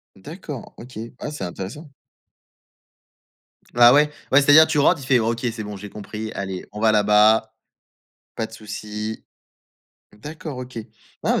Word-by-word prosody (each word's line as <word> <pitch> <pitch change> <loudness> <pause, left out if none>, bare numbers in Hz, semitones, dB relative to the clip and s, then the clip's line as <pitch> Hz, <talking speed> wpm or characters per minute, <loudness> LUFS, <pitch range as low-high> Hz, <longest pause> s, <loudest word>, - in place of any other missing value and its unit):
D'accord, 150 - -9
OK, 125 -1 -11 0.2
ah, - - -5
c'est 150 -9 -6
intéressant. 95 - -7 1.8
Ah 120 +1 +7
ouais? 150 +1 +4 0.2
Ouais, 140 - +6
c'est-à-dire, 145 +3 +7
tu - - -1
rentres, 145 0 +3
il - - -8
fait: 130 -1 +4
«OK 115 +1 -1
c'est 110 -1 -6
bon 105 0 -7
j'ai 105 +1 -9
compris, 105 +1 -7
allez 95 -2 -5
on 105 - -8
va 110 0 +4
là-bas, 105 +1 +4 0.8
pas 110 - -2
de 110 - -21
souci». 105 0 -6 0.9
D'accord, 150 +4 -8
OK. 125 -1 -9
Ouais, 110 - -6 0.4
bah, - - +1
110 Hz, 155 wpm, -22 LUFS, 105-140 Hz, 1.8 s, Ah